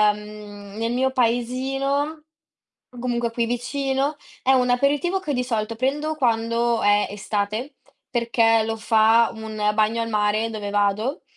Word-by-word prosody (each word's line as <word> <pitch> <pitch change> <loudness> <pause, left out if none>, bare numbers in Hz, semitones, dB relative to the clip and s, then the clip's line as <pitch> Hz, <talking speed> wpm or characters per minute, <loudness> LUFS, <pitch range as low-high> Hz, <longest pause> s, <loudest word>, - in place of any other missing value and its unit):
mhmm, 210 -1 -11
nel 230 +1 -1
mio 265 +1 +1
paesino, 270 +5 -1 0.7
comunque 240 -1 -2
qui 235 0 0
vicino, 270 +4 -1 0.3
è 265 - +4
un 250 -1 +3
aperitivo 290 +9 +1
che 300 -6 -3
di 250 0 0
solito 230 -2 -2
prendo 290 +6 -1
quando 235 -2 +1
è 205 0 +3
estate 210 +6 -3 0.3
perché 230 -2 +2
lo 225 0 -3
fa 225 +1 +4
un 215 -1 -2
bagno 220 +2 +2
al 230 - -2
mare 215 +1 +1
dove 210 -2 -5
vado, 205 +6 0
235 Hz, 135 wpm, -23 LUFS, 215-265 Hz, 0.7 s, è